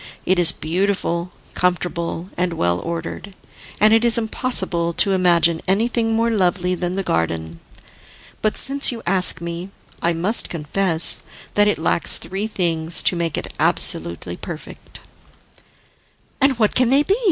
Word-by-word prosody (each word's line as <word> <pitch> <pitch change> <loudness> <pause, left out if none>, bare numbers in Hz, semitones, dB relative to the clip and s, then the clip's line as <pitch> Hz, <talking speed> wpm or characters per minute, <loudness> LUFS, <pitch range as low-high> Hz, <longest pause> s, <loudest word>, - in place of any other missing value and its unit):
It 185 0 +2
is 170 -2 +6
beautiful, 175 0 -2 0.2
comfortable 175 0 -2
and 180 0 -1
well 85 - 0
ordered, 170 +4 -6 0.4
and 215 +1 +5
it 225 +1 +4
is 235 -1 +4
impossible 195 -7 0
to 195 - +2
imagine 170 -3 +3
anything 225 +3 +1
more 230 +1 +1
lovely 185 -3 0
than 180 0 -3
the 195 - -2
garden. 80 - -2 0.8
But 215 - 0
since 275 +1 0
you 230 -2 -8
ask 180 -1 +3
me, 170 +2 -5 0.3
I 170 - +1
must 185 +8 +1
confess 165 +1 +1 0.3
that 205 0 +3
it 210 - +1
lacks 160 +1 +1
three 195 +4 -4
things 165 -5 -1
to - - +3
make 170 -2 -2
it - - -6
absolutely 85 +1 +1
perfect." 165 - -9 1.4
"And 270 -2 +3
what 215 -3 +2
can 255 -2 +2
they 275 +3 +4
be?" 390 - +1
180 Hz, 145 wpm, -20 LUFS, 170-210 Hz, 1.4 s, is